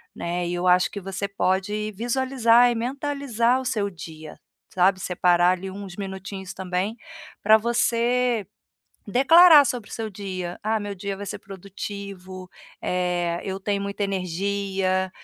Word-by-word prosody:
né, 175 0 -3
e 175 - -3
eu 175 +1 -1
acho 180 0 +4
que 200 - -5
você 195 +1 -4
pode 200 +2 -1
visualizar 245 0 +3
e - - -2
mentalizar 255 -1 0
o - - -9
seu 215 -5 -1
dia, 160 -4 -10 0.3
sabe, 185 +1 +2
separar 180 -1 +3
ali 190 +1 -7
uns 195 -2 -8
minutinhos 190 -1 -6
também 190 +3 -2 0.5
para 215 +1 +7
você 235 0 +1 0.6
declarar 300 - +7
sobre 245 -4 -3
o - - -10
seu 220 -2 -4
dia: 185 -3 -5
"Ah, 220 +1 0
meu 205 0 -5
dia 195 +1 -5
vai 205 - -7
ser 210 - -5
produtivo, 195 -1 -8 0.3
eh, 175 -1 -1
eu 190 0 -3
tenho 200 0 -1
muita 200 +1 -4
energia, 190 0 -1
200 Hz, 145 wpm, -24 LUFS, 185-225 Hz, 0.6 s, para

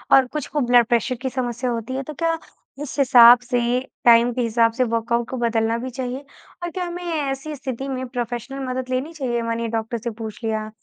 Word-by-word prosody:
और 265 -1 +5
कुछ 300 +2 -5
को 295 - -2
ब्लड 245 -1 +6
प्रेशर 240 +1 +1
की 260 - -1
समस्या 250 -1 -2
होती 230 +2 -4
है 270 - -2
तो 305 - -7
क्या 330 +3 0 0.5
इस 285 - -7
हिसाब 245 -2 +8
से, 245 0 0 0.3
टाइम 235 +1 +6
के 250 - -1
हिसाब 230 0 +2
से 255 - +3
वर्कआउट 230 0 -1
को 260 - -4
बदलना 230 -1 +1
भी 250 +2 -5
चाहिए? 255 +2 -5 0.4
और 345 - -2
क्या 365 +1 -3
हमें 350 +1 -6
ऐसी 300 -3 -3
स्थिति 265 0 -5
में 260 -1 -3
प्रोफ़ेशनल 245 +2 -4
मदद 255 0 -3
लेनी 260 +6 -2
चाहिए 245 -6 -2
मानिए 230 0 -2
डॉक्टर 225 +1 -3
से 235 +2 -4
पूछ 220 +2 -8
लिया 215 -1 -2
245 Hz, 210 wpm, -22 LUFS, 235-270 Hz, 0.5 s, हिसाब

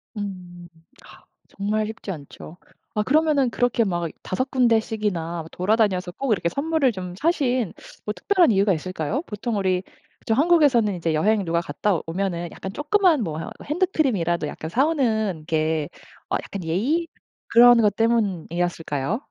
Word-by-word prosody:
음. 180 -4 -7 0.4
아 - - -16 0.3
정말 210 +2 -1
쉽지 220 -2 -6
않죠. 155 +1 -10 0.4
아 210 - +1
그러면은 295 -2 +3
그렇게 245 -1 +1
막 175 -5 -2
5 260 +8 -2
군데씩이나 215 -9 0
돌아다녀서 190 -2 +1
꼭 260 +6 -3
이렇게 175 -4 +1
선물을 285 - +1
좀 180 -3 -7
사신 255 - 0 0.3
뭐 210 - -2
특별한 355 - +3
이유가 195 -1 +3
있을까요? 185 - -3
보통 210 +1 -3
우리 185 -2 0 0.4
그쵸 225 - -1
한국에서는 275 - +4
이제 165 -2 -1
여행 200 +5 +2
누가 170 +1 0
갔다 170 +4 -1
오면은 175 0 -2
약간 190 +1 -7
쪼끄만 315 - +2
뭐 155 -3 -4 0.3
핸드크림이라도 265 - 0
약간 160 +2 -6
사 260 - +2
오는 220 - 0
게 155 -1 0 0.4
어 - - 0
약간 200 - -6
예의 265 - 0 0.4
그런 240 0 +7
것 205 -2 +2
때문이었을까요? 175 - -1
205 Hz, 325 characters per minute, -23 LUFS, 175-245 Hz, 0.4 s, 그런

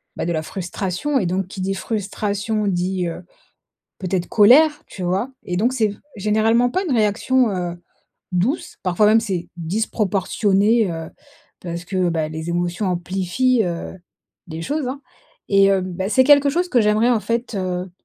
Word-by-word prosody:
bah, - - -3
de 170 - -1
la 160 - -1
frustration 190 - -2
et 195 - -1
donc 185 +2 -1
qui 190 0 -7
dit 195 +1 -1
frustration, 210 +1 -2
dit, 180 0 -1
heu, 170 +2 -6 0.8
peut-être 185 -1 -2
colère, 295 +8 +5
tu 190 - -9
vois? 190 +8 -1
Et 180 - -3
donc 230 +7 +2
c'est 215 -5 +1 0.2
généralement 220 +4 +2
pas 375 +6 -1
une 325 - -1
réaction, 230 +4 +2
heu, 175 -2 -3 0.6
douce 210 - -1
parfois 185 +3 +2
même 220 +2 +5
c'est 190 -6 -3
disproportionné, 200 +3 +1
heu, 165 0 -6 0.5
parce 170 0 -6
que, 185 -2 0
bah, 160 -2 -1
les 160 +2 -5
émotions 175 +3 -1
amplifient, 190 +7 0
heu, 175 +1 -5 0.5
les 160 0 -6
choses, 290 - -2
hein, 270 +2 -5 0.5
et 195 -1 +5
heu, 195 - +2
bah, 185 +1 -4
c'est 260 +3 +4
quelque 285 0 +6
chose 350 +5 0
que 250 -8 +3
j'aimerais 215 +3 +3
en 235 -3 +2
fait, 235 +1 -2
heu, 185 -1 -3
195 Hz, 165 wpm, -21 LUFS, 180-230 Hz, 0.8 s, quelque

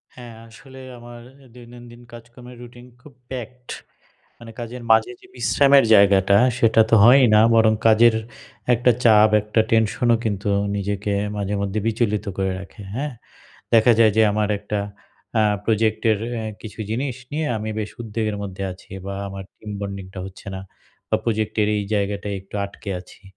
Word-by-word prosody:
হ্যাঁ, 120 -2 -11
আসলে 130 +3 -14 0.2
আমার 120 0 -12 0.4
দৈনন্দিন 120 0 -14
কাজকর্মের 120 +1 -13
routine 120 +1 -13
খুব 145 +1 -16 0.2
packed 125 0 -8 0.7
মানে 115 -1 -11
কাজের 120 +1 -7
মাঝে 110 - +3
যে, - - -17
বিশ্রামের 140 -1 +4
জায়গাটা 100 -1 +5 0.2
সেটা 115 -1 +4
তো - - +5
হয়ই 130 +3 +7
না 105 - +6
বরং 110 -1 +4
কাজের 115 +1 +5 0.6
একটা 125 +1 +3
চাপ 110 -2 +6
একটা 105 +2 -1
tension 110 +2 +1
ও - - +4
কিন্তু 100 -1 -2 0.3
নিজেকে 100 +1 -2 0.2
মাঝে 100 0 -3
মধ্যে 100 +1 -2
বিচলিত 110 -2 -1
করে 95 -1 0
রাখে 100 +2 -12
হ্যাঁ? 140 +2 -3 0.6
দেখা 115 +1 +6
যায় 110 -2 +6
যে, - - +6
আমার 105 0 0
একটা 105 0 -4 0.6
আ - - +4 0.2
project 110 -1 +1
এর 105 - 0 0.2
এ - - -4 0.2
কিছু 110 0 -10
জিনিস 125 +3 -2 0.2
নিয়ে 155 +2 -2
আমি 110 +1 -5
বেশ 105 -1 -5
উদ্বেগের 110 -2 -3
মধ্যে 95 -1 -6
আছি 90 - -15
বা 100 - -5
আমার 95 0 -8
team 105 - -10
bonding 100 -2 -6
টা 95 - -7
হচ্ছে 95 0 -12
না 95 - -6 0.5
বা - - +2
project 110 -2 -2
এর 105 - +2
এই 105 - -2
জায়গাটায় 100 0 -2
একটু 95 +2 -12
আটকে 100 +1 -10
আছি, 90 - -19
110 Hz, 165 wpm, -21 LUFS, 100-120 Hz, 0.7 s, হয়ই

